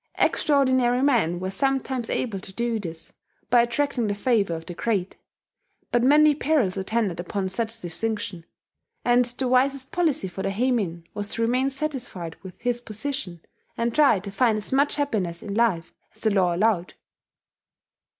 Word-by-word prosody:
Extraordinary 260 Hz, -3 st, +3 dB
men 225 Hz, -, +2 dB
were 185 Hz, +1 st, -3 dB
sometimes 265 Hz, +2 st, -1 dB
able 220 Hz, -6 st, -2 dB
to 190 Hz, -, -9 dB
do 235 Hz, +2 st, -1 dB
this, 165 Hz, -4 st, -8 dB, 0.4 s
by 240 Hz, -1 st, +7 dB
attracting 240 Hz, -1 st, 0 dB
the 205 Hz, -, -1 dB
favour 205 Hz, -6 st, +1 dB
of 165 Hz, 0 st, -8 dB
the 175 Hz, -, -6 dB
great. 195 Hz, 0 st, -1 dB, 0.8 s
But 240 Hz, -, +3 dB
many 295 Hz, +4 st, +6 dB
perils 285 Hz, -10 st, +1 dB
attended 195 Hz, -2 st, -1 dB
upon 190 Hz, +2 st, -2 dB
such 225 Hz, +3 st, -3 dB
distinction; 190 Hz, -1 st, -4 dB, 0.6 s
and 245 Hz, 0 st, +4 dB
the 250 Hz, +2 st, -2 dB
wisest 260 Hz, +1 st, +2 dB
policy 320 Hz, -, 0 dB
for 190 Hz, +1 st, -6 dB
the -, -, -1 dB
heimin 200 Hz, -6 st, 0 dB
was 205 Hz, -1 st, -3 dB
to 230 Hz, -, 0 dB
remain 255 Hz, +4 st, +2 dB
satisfied 260 Hz, -, -5 dB
with 185 Hz, -2 st, -10 dB
his 240 Hz, 0 st, -1 dB
position, 215 Hz, -, -5 dB, 0.4 s
and 230 Hz, 0 st, 0 dB
try 285 Hz, -7 st, +5 dB
to 200 Hz, 0 st, -7 dB
find 220 Hz, +2 st, +2 dB
as 210 Hz, +4 st, -3 dB
much 280 Hz, +2 st, +3 dB
happiness 200 Hz, -, -2 dB
in 200 Hz, -, -5 dB
life 210 Hz, -7 st, +1 dB, 0.2 s
as -, -, -19 dB
the 220 Hz, -, +2 dB
law 185 Hz, -3 st, +2 dB
allowed. 190 Hz, -2 st, +1 dB
230 Hz, 160 wpm, -25 LUFS, 190-255 Hz, 0.8 s, by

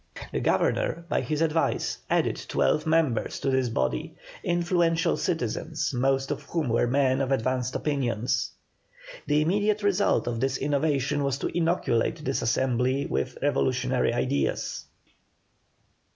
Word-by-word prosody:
The -, -, -1 dB
Governor, 170 Hz, -, 0 dB
by -, -, +1 dB
his 155 Hz, 0 st, -2 dB
advice, 165 Hz, 0 st, 0 dB
added -, -, +1 dB
twelve 155 Hz, +1 st, +1 dB
new -, -, +1 dB
members 155 Hz, -8 st, +1 dB
to 135 Hz, -, +1 dB
this 130 Hz, -2 st, +1 dB
body, 65 Hz, -, -2 dB, 0.3 s
influential 175 Hz, -1 st, +1 dB
citizens, -, -, -2 dB
most 135 Hz, +2 st, +1 dB
of 145 Hz, -, -3 dB
whom 160 Hz, -6 st, -2 dB
were 115 Hz, +1 st, +2 dB
men 130 Hz, +1 st, +2 dB
of 135 Hz, 0 st, -1 dB
advanced 130 Hz, 0 st, 0 dB
opinions. 125 Hz, -6 st, -1 dB, 0.8 s
The 150 Hz, +1 st, +3 dB
immediate 205 Hz, +5 st, +1 dB
result 205 Hz, 0 st, +2 dB
of 120 Hz, -1 st, -2 dB
this 135 Hz, +1 st, 0 dB
innovation 145 Hz, 0 st, 0 dB
was 140 Hz, -1 st, 0 dB
to -, -, -4 dB
inoculate 165 Hz, -4 st, 0 dB
this 135 Hz, -, 0 dB
assembly 130 Hz, +3 st, +1 dB
with 170 Hz, -, -2 dB
revolutionary 130 Hz, -3 st, +1 dB
ideas. 130 Hz, +4 st, -1 dB
140 Hz, 135 wpm, -26 LUFS, 130-160 Hz, 0.8 s, The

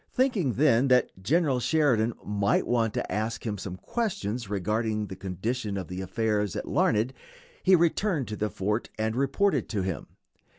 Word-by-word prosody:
Thinking 225 Hz, -, +1 dB
then 135 Hz, 0 st, +4 dB
that 125 Hz, -1 st, +4 dB
General 140 Hz, -, +2 dB
Sheridan 125 Hz, -4 st, +2 dB
might 100 Hz, -1 st, +1 dB
want 115 Hz, -3 st, +1 dB
to -, -, -2 dB
ask 110 Hz, +2 st, -2 dB
him 105 Hz, -3 st, -2 dB
some 95 Hz, -1 st, -5 dB
questions 120 Hz, -, -3 dB
regarding 105 Hz, +2 st, -1 dB
the 95 Hz, -, -7 dB
condition 100 Hz, +4 st, -3 dB
of 90 Hz, -2 st, -6 dB
affairs 105 Hz, +1 st, -1 dB
at -, -, -4 dB
Larned, 110 Hz, +5 st, +2 dB, 0.5 s
he 190 Hz, 0 st, +6 dB
returned 170 Hz, -, +1 dB
to 105 Hz, -, -3 dB
the 105 Hz, 0 st, -1 dB
fort 105 Hz, +4 st, -2 dB
and 110 Hz, +1 st, -1 dB
reported 140 Hz, -, +1 dB
to 105 Hz, -5 st, -1 dB
him. 95 Hz, -5 st, -3 dB
110 Hz, 160 wpm, -27 LUFS, 105-135 Hz, 0.5 s, he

